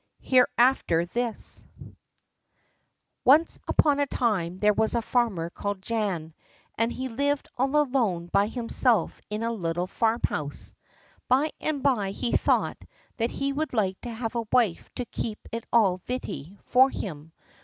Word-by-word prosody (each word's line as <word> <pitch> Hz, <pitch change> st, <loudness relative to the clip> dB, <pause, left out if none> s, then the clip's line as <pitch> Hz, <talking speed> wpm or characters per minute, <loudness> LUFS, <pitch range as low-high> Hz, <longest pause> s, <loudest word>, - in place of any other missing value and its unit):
Hereafterthis 240 Hz, -4 st, +2 dB, 1.6 s
Once 300 Hz, +6 st, +5 dB
upon 290 Hz, -2 st, +3 dB
a 285 Hz, -, +2 dB
time 190 Hz, -10 st, 0 dB
there 210 Hz, +2 st, +3 dB
was 220 Hz, +3 st, +1 dB
a 235 Hz, -, +2 dB
farmer 210 Hz, -10 st, 0 dB
called 200 Hz, 0 st, -4 dB
Jan, 195 Hz, -9 st, -2 dB, 0.4 s
and 230 Hz, +1 st, 0 dB
he 260 Hz, +1 st, -4 dB
lived 280 Hz, +4 st, -1 dB
all 265 Hz, +3 st, 0 dB
alone 245 Hz, -12 st, +1 dB
by 200 Hz, +4 st, +2 dB
himself 230 Hz, -3 st, +1 dB
in 210 Hz, +1 st, -3 dB
a 230 Hz, -, 0 dB
little 175 Hz, -4 st, -2 dB
farmhouse. 220 Hz, -9 st, -1 dB, 0.5 s
By 275 Hz, +5 st, +3 dB
and 300 Hz, -3 st, -2 dB
by 240 Hz, -9 st, +2 dB
he 220 Hz, +4 st, -3 dB
thought -, -, +1 dB, 0.4 s
that 230 Hz, +1 st, 0 dB
he 275 Hz, +2 st, -2 dB
would 305 Hz, +1 st, -2 dB
like 195 Hz, -5 st, 0 dB
to 245 Hz, -, -6 dB
have 225 Hz, 0 st, -4 dB
a 230 Hz, -2 st, -2 dB
wife 230 Hz, -9 st, +2 dB
to 250 Hz, -, -3 dB
keep 220 Hz, -2 st, -4 dB
it 230 Hz, 0 st, -5 dB
all 200 Hz, -6 st, +4 dB
vitty 200 Hz, -, -5 dB
for 260 Hz, +2 st, +5 dB
him. 160 Hz, -, -6 dB
230 Hz, 145 wpm, -26 LUFS, 190-255 Hz, 1.6 s, Once